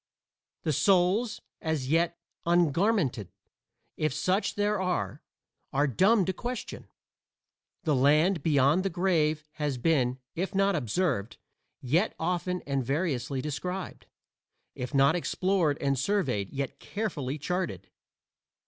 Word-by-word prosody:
"The 155 - +1
souls 195 - +2 0.2
as 155 -5 -1
yet 170 +2 +2 0.3
ungarmented," 170 - +2 0.7
if 155 -3 0
such 185 +7 0
there 205 -1 +1
are, 180 - -2 0.5
are 145 +2 +2
dumb 190 - +3
to 190 - -1
question. 245 +5 -6 1.0
The 155 - +2
Land 150 +7 +4
beyond 145 +2 +3
the 195 - 0
Grave 165 -4 +1
has 145 -4 -1
been, 130 -3 +1 0.2
if 190 +3 -3
not 195 0 +3
observed, 125 - -1 0.4
yet 165 - +1
often 180 +2 -1
and 140 -2 -1
variously 135 -2 -1
described: 180 +6 -5 0.7
if 125 - -5
not 140 +3 +4
explored 175 -3 +1
and 140 -2 0
surveyed, 135 - 0
yet 140 -1 -4
carefully 155 - -3
charted. 155 - -3
160 Hz, 115 wpm, -28 LUFS, 140-185 Hz, 1.0 s, Land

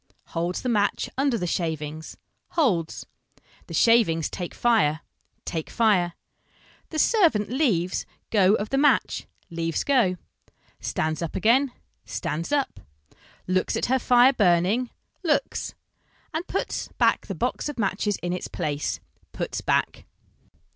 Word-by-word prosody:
Holds 170 +2 -2
the - - -2
match 205 -3 +1
under 270 -2 +1
the 180 - -2
shavings, 160 -2 -3 0.4
holds. 190 - +1 0.6
The - - -6
shavings 215 -9 +4
take 175 -2 -5
fire, 200 -11 +2 0.4
take 160 -2 -4
fire. 195 -7 +2 0.8
The 315 - -5
servant 310 - +3
leaves 210 - +1 0.2
go 200 -1 +5
of 210 0 -3
the 270 - +2
match, 295 - +2 0.2
leaves 165 -1 -1
go. 240 -10 +2 0.6
Stands 155 +1 -2
up 170 - -4
again, 250 +6 +3 0.3
stands 165 - -4
up. 285 -2 0 0.7
Looks 185 0 0
at - - 0
her 260 - +3
fire 245 +2 +5
burning, 200 +4 +2 0.3
looks. 330 -5 -1 0.6
And 325 +3 -3
puts - - -2
back - - +2
the - - -4
box - - -2
of 295 - -6
matches 205 -1 0
in 175 0 -1
its 180 - -4
place, 145 -1 -2 0.3
puts - - -3
back? - - 0
205 Hz, 130 wpm, -25 LUFS, 170-255 Hz, 0.8 s, go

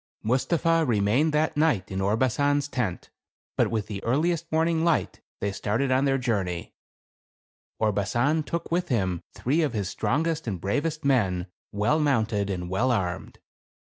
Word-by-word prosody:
Mustapha 165 +7 +2
remained 120 +4 +2
that 155 +1 +1
night 150 -12 +1
in 95 0 -2
Orbasan's 130 +7 +1
tent, 120 -10 -3 0.4
but - - +2
with 110 -3 -1
the 100 -2 -6
earliest 165 +7 0
morning 160 +1 +2
light, 170 -1 0 0.2
they 100 - 0
started 110 +7 -1
on 130 +2 +3
their 135 -1 +2
journey 100 -9 -2 0.5
" - - -68
Orbasan 110 +9 +1
took 165 +3 -4
with 175 +1 0
him 95 -8 0
three 145 +7 +1
of 150 -6 0
his 100 -4 -2
strongest 160 +6 -1
and 95 -5 -2
bravest 145 - -2
men, 100 -10 +2 0.3
well 105 +10 +1
mounted 110 -8 +1
and 90 -2 -3
well 110 +8 +1
armed. 90 -7 -2
125 Hz, 150 wpm, -26 LUFS, 100-155 Hz, 0.5 s, on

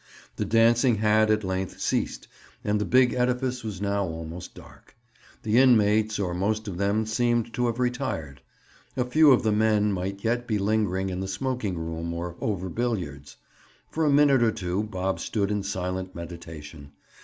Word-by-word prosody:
The - - -1
dancing 115 +2 +4
had, 110 +1 +3
at 110 0 +2
length, 95 0 -3
ceased - - -2 0.4
and 105 0 0
the - - 0
big 125 0 +4
edifice 125 0 -1
was 105 -4 -5
now 100 0 0
almost 80 0 -7
dark. - - -16 0.5
The 110 +2 +3
inmates, 110 -4 +4
or 95 -3 -2
most 105 +4 -1
of 90 -3 -5
them, 100 +2 +1
seemed 120 +1 0
to 125 0 0
have 115 -1 -2
retired. 125 - -3 0.6
A 125 - +1
few 150 +4 +5
of 130 - +4
the 110 - +2
men 105 -1 +2
might 95 +1 -4
yet 120 +2 0
be 110 - 0
lingering 100 -2 0
in 90 - -4
the 95 - -3
smoking 105 -2 -2
room 85 +1 -4
or 85 0 -5
over 95 -4 -2
billiards. 85 - -4 0.5
For 160 - -1
a 150 - +3
minute 140 -2 +5
or 115 -1 +4
two 95 -3 -2
Bob 95 -3 -3
stood 105 -2 -1
in 105 -1 0
silent 95 -1 -4
meditation. 80 -4 -9
105 Hz, 175 wpm, -26 LUFS, 90-120 Hz, 0.6 s, few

